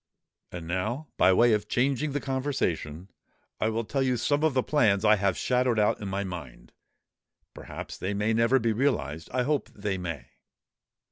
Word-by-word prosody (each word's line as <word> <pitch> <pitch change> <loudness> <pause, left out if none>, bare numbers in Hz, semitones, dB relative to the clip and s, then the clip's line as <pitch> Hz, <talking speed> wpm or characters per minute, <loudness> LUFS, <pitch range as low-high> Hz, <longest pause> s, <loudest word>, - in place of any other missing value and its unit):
And 85 -2 -7
now, 110 - -2
by 95 - +5
way 115 +5 +5
of 105 0 0
changing 140 +5 0
the 145 - -1
conversation, 100 - -2 0.5
I 110 - +1
will 115 +1 -1
tell 135 +5 -2
you 130 -2 +1
some 145 +6 0
of 155 -4 +2
the 130 - +2
plans 110 -9 +2
I 110 0 +6
have 100 -2 0
shadowed 125 -2 +1
out 105 0 +2
in 100 - -4
my 100 +1 -2
mind. 75 -11 -8 0.8
Perhaps - - -8
they 100 +2 -2
may 105 +2 +1
never 115 +4 +3
be 115 -3 +1
realized:—I 110 - -1
hope 145 +1 -1
they 100 -2 -4
may." 80 -9 -6
110 Hz, 175 wpm, -27 LUFS, 95-130 Hz, 0.8 s, I